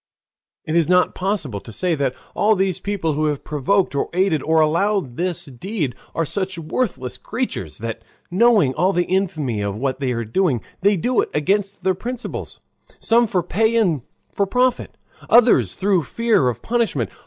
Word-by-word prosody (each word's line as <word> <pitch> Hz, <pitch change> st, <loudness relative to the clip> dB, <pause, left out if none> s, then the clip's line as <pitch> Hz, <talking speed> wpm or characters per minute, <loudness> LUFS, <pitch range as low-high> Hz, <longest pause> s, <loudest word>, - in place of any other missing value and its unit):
It 155 Hz, -, -2 dB
is 170 Hz, -1 st, +3 dB
not 180 Hz, 0 st, +4 dB
possible 180 Hz, -, -2 dB
to 115 Hz, -, -12 dB
say 180 Hz, -, 0 dB
that 140 Hz, -4 st, -1 dB, 0.2 s
all 215 Hz, +1 st, +3 dB
these 190 Hz, -2 st, 0 dB
people 195 Hz, -6 st, -2 dB
who 155 Hz, +2 st, 0 dB
have 150 Hz, -2 st, -1 dB
provoked 155 Hz, +6 st, +1 dB
or 140 Hz, -, -1 dB
aided 180 Hz, -4 st, +2 dB
or 160 Hz, +3 st, +2 dB
allowed 165 Hz, -2 st, +1 dB
this 175 Hz, +1 st, -2 dB
deed 150 Hz, -, -4 dB, 0.2 s
are 165 Hz, -, 0 dB
such 190 Hz, +3 st, -2 dB
worthless 160 Hz, -, -3 dB
creatures 165 Hz, -, -4 dB
that, 115 Hz, +1 st, -5 dB, 0.3 s
knowing 200 Hz, -, +4 dB
all 185 Hz, +6 st, +1 dB
the 175 Hz, -1 st, +1 dB
infamy 155 Hz, -, -1 dB
of 100 Hz, -1 st, -2 dB
what 130 Hz, +2 st, -2 dB
they 135 Hz, -2 st, -1 dB
are 115 Hz, -1 st, -3 dB
doing, 130 Hz, -, +1 dB, 0.2 s
they 200 Hz, +1 st, +3 dB
do 245 Hz, +8 st, +1 dB
it -, -, -4 dB
against 195 Hz, +5 st, 0 dB
their 190 Hz, 0 st, +2 dB
principles, 245 Hz, +6 st, -6 dB, 0.4 s
some 235 Hz, +1 st, +3 dB
for 180 Hz, -4 st, 0 dB
pay 220 Hz, +6 st, +1 dB
and 180 Hz, -, +2 dB, 0.3 s
for 200 Hz, -, 0 dB
profit, 250 Hz, +4 st, 0 dB, 0.3 s
others 225 Hz, -, +5 dB
through 190 Hz, -2 st, +2 dB
fear 215 Hz, -, +1 dB
of 120 Hz, 0 st, -6 dB
punishment. 225 Hz, -, 0 dB
175 Hz, 175 wpm, -21 LUFS, 140-200 Hz, 0.4 s, others